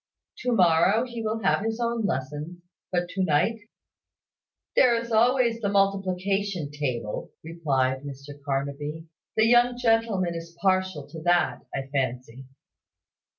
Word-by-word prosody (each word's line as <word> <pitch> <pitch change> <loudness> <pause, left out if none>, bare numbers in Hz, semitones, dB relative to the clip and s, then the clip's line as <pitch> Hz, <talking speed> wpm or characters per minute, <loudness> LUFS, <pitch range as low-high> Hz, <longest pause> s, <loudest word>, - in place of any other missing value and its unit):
To 250 - -1
morrow 185 +4 +4
he 240 -2 -6
will 220 0 -2
have 195 - +2
his 225 +1 -2
own 235 -2 0
lessons; 150 +5 -4 0.3
but 175 -1 0
to 190 +1 -1
night 185 +8 +2 0.6
" - - -66
"There 245 -2 +5
is 235 0 -3
always 235 +1 +3
the 200 - 0
multiplication 195 -3 0
table," 125 -7 -3
replied 135 -6 0
Mr 140 0 -9
Carnaby. 145 +3 -3 0.3
"The 220 - +5
young 240 +1 +4
gentleman 225 -7 +1
is 170 0 -8
partial 185 -5 +1
to 160 - -8
that, 175 -1 +2
I 135 - -2
fancy." 130 -1 -3
180 Hz, 135 wpm, -26 LUFS, 145-225 Hz, 0.6 s, There